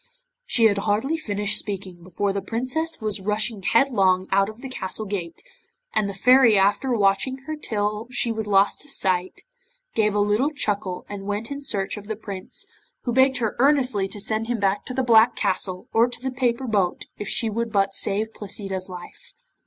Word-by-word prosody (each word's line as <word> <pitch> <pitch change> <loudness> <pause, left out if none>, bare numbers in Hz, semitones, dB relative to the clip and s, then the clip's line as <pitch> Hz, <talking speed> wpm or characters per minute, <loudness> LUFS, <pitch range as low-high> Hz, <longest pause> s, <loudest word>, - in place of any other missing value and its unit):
She 230 - +2
had 200 -2 +4
hardly 220 +9 0
finished 205 -9 0
speaking 190 -3 -6
before 195 +3 -2
the 200 - -2
Princess 255 - -2
was 210 -2 -2
rushing 210 +1 -1
headlong 190 -5 +3
out 195 +1 +3
of 220 +2 -11
the - - -4
castle 220 -4 -4
gate, 180 -5 -5 0.5
and 200 - +1
the 200 - -6
Fairy 250 +1 +6
after 205 +7 +2
watching 200 +6 +2
her 310 - -3
till 210 -5 -2
she 245 -1 -1
was 220 -1 -3
lost 200 0 +3
to 295 - -8
sight, 185 -9 0 0.5
gave 210 -2 +2
a - - +2
little 210 +7 +2
chuckle 200 -10 -2
and 200 -1 -7
went 210 +5 -3
in 280 0 -4
search 205 -7 -1
of 205 -1 -10
the 220 - -3
Prince, 200 -3 -6 0.4
who 240 - -1
begged 260 +1 +4
her 225 -4 -1
earnestly 255 -7 +3
to 205 - -10
send 220 +2 -1
him 240 -1 -1
back 200 0 0
to 255 - -5
the 265 - +1
Black 230 0 +5
Castle, 185 -2 -1
or 230 +2 +5
to 245 - -7
the 265 +2 -3
paper 250 0 0
boat 200 -6 0
if 210 - -4
she 230 - 0
would 230 +1 -2
but 195 -2 +2
save 215 +3 0
Placida's 195 -2 -4
life. 180 -1 -11
210 Hz, 190 wpm, -24 LUFS, 195-240 Hz, 0.5 s, Fairy